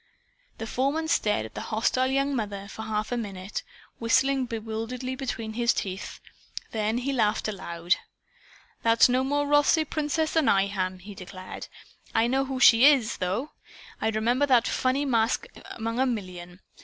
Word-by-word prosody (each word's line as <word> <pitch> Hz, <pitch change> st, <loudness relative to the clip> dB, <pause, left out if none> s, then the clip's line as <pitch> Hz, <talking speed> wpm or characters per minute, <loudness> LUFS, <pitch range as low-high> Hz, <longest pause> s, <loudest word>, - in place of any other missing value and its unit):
The 225 Hz, -, -5 dB
foreman 275 Hz, +7 st, -1 dB
stared 210 Hz, -, +1 dB
at 110 Hz, -, -11 dB
the -, -, -5 dB
hostile 230 Hz, +4 st, +1 dB
young 275 Hz, +1 st, 0 dB
mother 200 Hz, -4 st, -4 dB
for 220 Hz, -, -8 dB
a -, -, -6 dB
half 215 Hz, 0 st, -2 dB
minute, 200 Hz, -5 st, -4 dB, 0.4 s
whistling 265 Hz, +3 st, +2 dB
bewilderedly 230 Hz, +3 st, -4 dB
between 230 Hz, -4 st, -4 dB
his 235 Hz, +1 st, +2 dB
teeth. 190 Hz, 0 st, -5 dB, 0.5 s
Then 220 Hz, +1 st, 0 dB
he 265 Hz, +3 st, -1 dB
laughed 220 Hz, -4 st, +1 dB
aloud. 175 Hz, -4 st, -1 dB, 0.8 s
"That's 230 Hz, 0 st, +5 dB
no 255 Hz, +1 st, +2 dB
more 290 Hz, +2 st, 0 dB
Rothsay 290 Hz, +2 st, +4 dB
Princess 310 Hz, +1 st, -1 dB
than 320 Hz, -3 st, +3 dB
I 195 Hz, -1 st, +4 dB
am!" 190 Hz, -2 st, -2 dB
he 200 Hz, +3 st, -11 dB
declared. 185 Hz, 0 st, -9 dB, 0.5 s
"I 225 Hz, -, +4 dB
know 265 Hz, +3 st, +1 dB
who 265 Hz, -1 st, -4 dB
she 235 Hz, -1 st, +7 dB
IS, 265 Hz, -7 st, +3 dB
though. 200 Hz, +11 st, -2 dB, 0.5 s
I'd 220 Hz, 0 st, 0 dB
remember 240 Hz, +6 st, +2 dB
that 245 Hz, -4 st, +4 dB
funny 260 Hz, +3 st, 0 dB
mask 235 Hz, -, +1 dB, 0.2 s
among 230 Hz, +1 st, -4 dB
a 265 Hz, -, +3 dB
million. 185 Hz, -6 st, -5 dB
230 Hz, 160 wpm, -26 LUFS, 210-265 Hz, 0.8 s, she